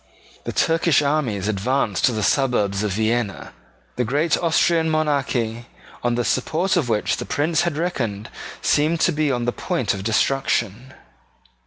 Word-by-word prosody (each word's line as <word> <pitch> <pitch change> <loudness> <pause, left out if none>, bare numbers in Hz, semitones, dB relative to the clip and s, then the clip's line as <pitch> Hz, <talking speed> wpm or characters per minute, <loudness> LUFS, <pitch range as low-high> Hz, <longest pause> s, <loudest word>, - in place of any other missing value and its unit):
The - - -3
Turkish 165 -2 +2
armies 130 -10 0
advanced 110 0 0
to - - +3
the 110 -2 -2
suburbs 105 -6 +1
of 105 -2 -1
Vienna. 110 0 -1 0.4
The 125 - +1
great 150 +7 +1
Austrian 165 -1 +2
monarchy, 135 -7 -1 0.3
on 120 0 0
the 120 0 -1
support 165 +9 0
of 155 -9 0
which 105 -2 0
the - - -5
Prince 160 +3 +1
had 170 -4 -1
reckoned, 120 - -3 0.3
seemed 155 +3 +2
to 180 - +3
be 150 -2 0
on 120 -2 -1
the 120 - +1
point 115 -3 -2
of 95 -1 -6
destruction. 115 +1 0
130 Hz, 155 wpm, -22 LUFS, 110-155 Hz, 0.4 s, to